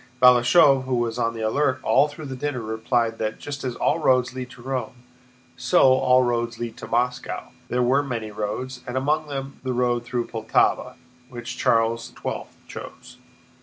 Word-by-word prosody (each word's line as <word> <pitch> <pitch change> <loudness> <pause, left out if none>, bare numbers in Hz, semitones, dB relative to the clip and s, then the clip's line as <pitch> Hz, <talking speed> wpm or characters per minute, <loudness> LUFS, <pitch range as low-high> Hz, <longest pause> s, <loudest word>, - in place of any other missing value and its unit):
Balashëv, 130 +2 +6
who 130 -1 0
was 120 0 -1
on 115 -1 0
the 115 - -5
alert 130 +4 +1
all 145 - +4
through 150 +1 -9
the 135 -1 -5
dinner, 145 0 -3
replied 115 +1 -1
that 110 0 -2
just 145 -1 -7
as 125 -2 -3
"all - - +1
roads 130 -4 +2
lead 130 -1 -6
to 125 - -14
Rome," 130 -1 -4 0.5
so 180 - +2
all 130 0 +4
roads 120 -1 -1
lead 115 -1 -5
to - - -8
Moscow: 125 +2 -2 0.2
there 125 +1 0
were 130 +3 +3
many 115 -6 -4
roads, 125 +5 -4
and 125 +1 -3
"among 150 +3 0
them 135 -1 -6
the 130 -1 -2
road 120 -1 +1
through 120 0 -2
Poltáva, 110 -1 0 0.3
which 120 -1 -7
Charles 115 0 +1
XII - - -4 0.2
chose." - - -10
125 Hz, 175 wpm, -24 LUFS, 115-130 Hz, 0.5 s, Balashëv